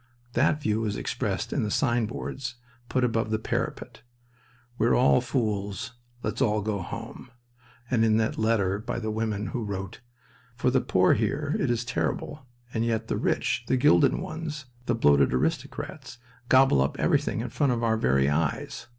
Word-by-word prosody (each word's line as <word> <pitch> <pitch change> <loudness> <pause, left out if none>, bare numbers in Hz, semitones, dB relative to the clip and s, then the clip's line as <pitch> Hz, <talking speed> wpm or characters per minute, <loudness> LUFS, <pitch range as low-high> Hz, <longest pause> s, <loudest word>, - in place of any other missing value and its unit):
That 145 +4 +2
view 110 -6 0
was 105 -2 -1
expressed - - -2
in - - 0
the 105 - -1
signboards 120 +2 -1 0.3
put 130 - +1
above 115 -2 +1
the 110 - +1
parapet, 110 - -4 0.8
"We're 115 +2 +4
all 125 0 +4
fools: 110 -3 -2 0.3
let's - - -2
all 105 -4 +2
go 105 -2 -2
home"; 115 +8 -8 0.6
and 120 -3 +2
in 110 -1 +4
that 110 -1 0
letter 100 -3 +1
by 110 - -4
the 110 -2 -2
woman 110 -1 -2
who 120 - -3
wrote: 95 0 -5 0.5
"For 125 +1 +1
the 130 0 +3
poor 95 0 +3
here 145 +7 -1
it 135 - 0
is 120 0 0
terrible, 130 +2 -3 0.3
and 110 - 0
yet 115 -1 -1
the - - 0
rich, - - 0
the 130 - +2
gilded 85 -8 +5
ones, 155 -3 -5 0.2
the 120 - +2
bloated 70 - +4
aristocrats, 115 - -3 0.3
gobble 130 - +5
up 70 - 0
everything - - +1
in 120 - -4
front 140 +2 +1
of 120 -1 -1
our 115 -1 +3
very 70 - +2
eyes... 75 - -1
115 Hz, 165 wpm, -27 LUFS, 105-125 Hz, 0.8 s, gilded